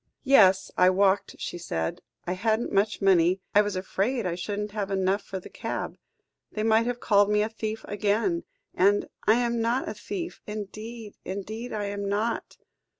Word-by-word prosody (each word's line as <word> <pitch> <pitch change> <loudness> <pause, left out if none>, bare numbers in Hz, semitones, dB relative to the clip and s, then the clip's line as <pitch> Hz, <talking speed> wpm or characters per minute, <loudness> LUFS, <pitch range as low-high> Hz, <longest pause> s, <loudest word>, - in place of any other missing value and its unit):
"Yes, 195 -9 +5
I 180 0 +6
walked," 195 +1 +2
she 175 - -5
said. 80 - -3 0.2
"I 180 - -1
hadn't 220 +4 0
much 200 +1 +1
money. 185 -1 +4
I 205 - +7
was 205 -2 -2
afraid 200 +5 -1
I 180 - 0
shouldn't 205 +4 -3
have 205 -2 -3
enough 195 +1 +1
for 190 - -6
the - - -11
cab. - - -4 0.6
They 215 - -2
might 225 +1 +3
have 245 0 -2
called 205 -3 +4
me 210 0 +3
a 215 - -2
thief 220 -1 -5
again 205 -4 0 0.3
and 200 +2 +3 0.2
I 215 - +7
am 235 -1 +1
not 235 +3 0
a - - -3
thief 355 -3 -6
indeed, 215 +1 -7
indeed, 215 +5 -5
I 210 -1 -2
am 200 0 -3
not." 215 +3 -2
205 Hz, 175 wpm, -27 LUFS, 195-220 Hz, 0.6 s, I